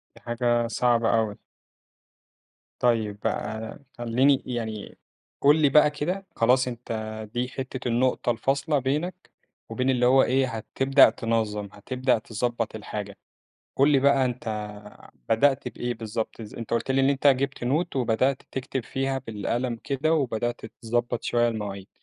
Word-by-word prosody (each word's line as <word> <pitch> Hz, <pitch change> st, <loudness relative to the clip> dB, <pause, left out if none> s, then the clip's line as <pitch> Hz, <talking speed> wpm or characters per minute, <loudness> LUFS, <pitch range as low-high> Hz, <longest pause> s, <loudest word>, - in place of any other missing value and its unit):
دي -, -, -15 dB
حاجة 120 Hz, 0 st, 0 dB
صعبة 120 Hz, 0 st, +2 dB
أوي. 105 Hz, -2 st, -1 dB, 1.4 s
طيب 110 Hz, -4 st, +1 dB
بقى 110 Hz, +3 st, -3 dB, 0.2 s
خلّيني 125 Hz, +4 st, +2 dB
يعني 110 Hz, -4 st, -5 dB, 0.4 s
قُل 145 Hz, +2 st, +6 dB
لي 145 Hz, -, +5 dB
بقى 150 Hz, +1 st, +6 dB
كده، 180 Hz, +6 st, -3 dB
خلاص 125 Hz, +2 st, +3 dB
أنت 120 Hz, -1 st, -7 dB, 0.4 s
دي 125 Hz, +1 st, -1 dB
حِتّة 130 Hz, -1 st, -5 dB
النُقطة 120 Hz, +1 st, +1 dB
الفاصلة 135 Hz, +5 st, 0 dB
بينك 155 Hz, +8 st, -3 dB, 0.4 s
وبين 125 Hz, +3 st, -1 dB
اللي 125 Hz, -1 st, +2 dB
هو 130 Hz, +2 st, +6 dB
إيه 130 Hz, +1 st, +2 dB
هتبدأ 135 Hz, +4 st, +4 dB
تنظم، 110 Hz, -3 st, -2 dB
هتبدأ 125 Hz, +3 st, 0 dB
تضبط 115 Hz, 0 st, -3 dB
الحاجة، 105 Hz, -1 st, -6 dB, 0.6 s
قُل 140 Hz, +2 st, +5 dB
لي 135 Hz, -2 st, +4 dB
بقى 140 Hz, -1 st, +4 dB
أنت 125 Hz, 0 st, -3 dB, 0.8 s
بدأت 135 Hz, +4 st, +3 dB
بإيه 120 Hz, 0 st, -4 dB
بالضبط 110 Hz, 0 st, -4 dB
ز 105 Hz, -, -10 dB
أنت 115 Hz, -, -7 dB
قُلت 115 Hz, +3 st, 0 dB
لي 135 Hz, 0 st, +3 dB
إن 135 Hz, -, +3 dB
أنت 140 Hz, +1 st, 0 dB
جِبت 135 Hz, -2 st, +2 dB
Note 155 Hz, +4 st, 0 dB
وبدأت 130 Hz, +2 st, +1 dB
تكتب 130 Hz, -2 st, -3 dB
فيها 135 Hz, 0 st, -2 dB
بالقلم 120 Hz, +1 st, -3 dB
كده، 150 Hz, +4 st, +1 dB
وبدأت 120 Hz, -5 st, -1 dB, 0.2 s
تضبط 120 Hz, +1 st, -1 dB
شوية 120 Hz, 0 st, +2 dB
المواعيد، 100 Hz, -3 st, -5 dB
125 Hz, 140 wpm, -26 LUFS, 115-135 Hz, 1.4 s, قُل